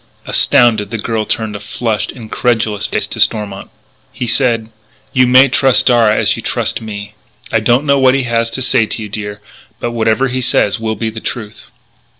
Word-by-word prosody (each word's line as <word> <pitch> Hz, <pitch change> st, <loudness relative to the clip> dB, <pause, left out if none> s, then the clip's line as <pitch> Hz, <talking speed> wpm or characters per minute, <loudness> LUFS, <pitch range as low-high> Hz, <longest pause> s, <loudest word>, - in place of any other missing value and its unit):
Astounded, 115 Hz, -4 st, +3 dB
the 115 Hz, -, -4 dB
girl 110 Hz, 0 st, -2 dB
turned 110 Hz, -2 st, -2 dB
a -, -, -5 dB
flushed, 110 Hz, +1 st, -3 dB
incredulous 110 Hz, -2 st, -1 dB
face -, -, -2 dB
to -, -, -7 dB
Stormont. 100 Hz, -2 st, 0 dB, 0.4 s
He 125 Hz, -, -4 dB
said: 115 Hz, -2 st, +1 dB, 0.4 s
"You 130 Hz, -1 st, +4 dB
may 130 Hz, +2 st, +6 dB
trust 135 Hz, 0 st, +2 dB
Darragh 115 Hz, -4 st, +4 dB
as -, -, +2 dB
you -, -, -6 dB
trust -, -, -2 dB
me. 105 Hz, -1 st, -7 dB, 0.4 s
I 110 Hz, -, +2 dB
don't 120 Hz, +6 st, +2 dB
know 140 Hz, -1 st, +3 dB
what 130 Hz, 0 st, +4 dB
he 135 Hz, -, 0 dB
has 115 Hz, -1 st, 0 dB
to 130 Hz, -, -1 dB
say 115 Hz, -3 st, +2 dB
to 110 Hz, -, -4 dB
you, 105 Hz, -, -7 dB
dear. 105 Hz, 0 st, -6 dB, 0.4 s
But 120 Hz, -, -3 dB
whatever 115 Hz, +3 st, +1 dB
he 130 Hz, 0 st, -2 dB
says 110 Hz, -2 st, +1 dB
will 110 Hz, -1 st, -2 dB
be 110 Hz, 0 st, -3 dB
the 110 Hz, -, -7 dB
truth." 110 Hz, -2 st, -7 dB
115 Hz, 190 wpm, -15 LUFS, 110-125 Hz, 0.4 s, may